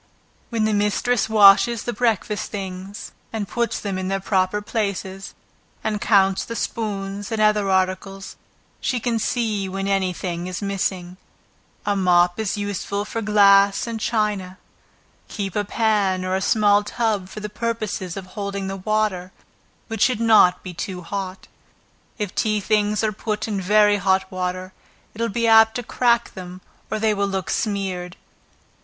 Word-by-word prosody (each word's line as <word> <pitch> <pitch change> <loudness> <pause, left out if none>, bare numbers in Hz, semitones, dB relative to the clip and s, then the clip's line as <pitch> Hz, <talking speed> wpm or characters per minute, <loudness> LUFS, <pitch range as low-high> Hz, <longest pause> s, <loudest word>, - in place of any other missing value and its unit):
Where 230 - -3
the 215 0 +2
mistress 210 +3 +1
washes 215 +2 +6
the 240 - -3
breakfast 215 -2 -1
things, 195 0 -7 0.2
and 215 -3 -3
puts 235 +2 -1
them 195 -2 -3
in 185 - -3
their 195 +1 -1
proper 190 0 +1
places, 200 -3 -4 0.5
and 210 -2 -2
counts 195 -3 +3
the 230 - -6
spoons, 205 -2 -4
and 220 - -1
other 210 -2 +3
articles, 190 +1 -1 0.4
she 250 - -1
can 230 0 -1
see 215 -4 -1
when 195 +1 -3
any 195 -2 +1
thing 175 0 -4
is 185 -1 -4
missing. 190 -3 -3 0.7
A 205 - +1
mop 180 -1 +3
is 215 -1 -1
useful 205 0 -3
for 225 +1 -4
glass 200 -2 +5
and 230 -1 -4
china; 210 -5 -1 0.7
keep 195 -4 -5
a 210 - +1
pan, 205 -3 +1
or 185 - -1
a 190 - -1
small 205 0 +4
tub, 205 -3 -1
for 215 - -8
the 210 - -4
purpose 215 -1 -3 0.2
of 195 - -6
holding 200 0 -5
the 195 0 -4
water, 195 -2 -1 0.6
which 225 -1 -5
should 250 -3 +3
not 220 -6 +5
be 185 - -7
too 180 +1 -5
hot. 190 +1 -5 0.7
If 210 -4 -3
tea 215 -1 +1
things 210 +1 +1
are 215 - +1
put 215 +1 -3
in 205 -3 -2
very 205 +2 +4
hot 190 -1 +1
water, 185 0 -4 0.4
it 220 - -7
will 230 - +1
be 230 +3 -1
apt 220 0 +6
to 245 - -3
crack 235 0 +1
them 185 -1 -9 0.3
or 215 - -1
they 215 0 +2
will 200 -1 0
look 190 -2 -3
smeared. 190 -4 -2
200 Hz, 160 wpm, -22 LUFS, 190-215 Hz, 0.7 s, washes